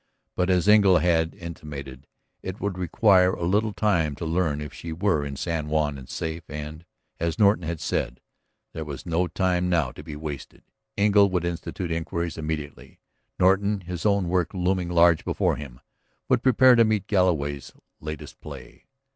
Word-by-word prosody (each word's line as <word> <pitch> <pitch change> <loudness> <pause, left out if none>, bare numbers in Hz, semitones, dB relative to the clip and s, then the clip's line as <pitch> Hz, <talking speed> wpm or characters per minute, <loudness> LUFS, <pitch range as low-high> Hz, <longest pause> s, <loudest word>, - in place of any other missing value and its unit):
But, 90 +1 0
as 90 0 +2
Engle 100 -4 +6
had 80 -2 +1
intimated, 70 -6 -8 0.3
it 95 +2 -6
would 100 -2 -2
require 90 +1 +3
but - - -5
little 105 +5 +1
time 85 -9 +1
to 85 - -6
learn 80 -3 0
if 75 -1 -7
she 85 - -7
were 85 -2 +1
in 70 -1 -5
San 80 +1 -3
Juan 75 -2 0
and 65 - -13
safe, 80 +1 -4
and, 75 +2 -7 0.4
as 85 -1 -1
Norton 100 -5 +3
had 85 0 -3
said, 60 - -2 0.5
there 80 - -4
was 75 -3 -7
no 85 +1 0
time 90 +1 0
now 80 -8 +1
to - - -11
be 75 - -8
wasted. 75 -2 -7 0.3
Engle 100 -1 +5
would 90 -2 -1
institute 85 +1 -4
inquiries 85 0 -3
immediately; 75 -2 -6 0.4
Norton, 100 +2 +3
his 90 -1 -6
own 100 -3 +2
work 90 +1 0
looming 90 -1 0
large 85 -1 +4
before - - 0
him, 65 -5 -9 0.5
would 125 -2 +2
prepare 130 0 +6
to 115 -1 +6
meet 110 -3 0
Galloway's 80 -8 0 0.3
latest 75 -1 -8
play. - - -11
85 Hz, 170 wpm, -25 LUFS, 75-95 Hz, 0.5 s, Engle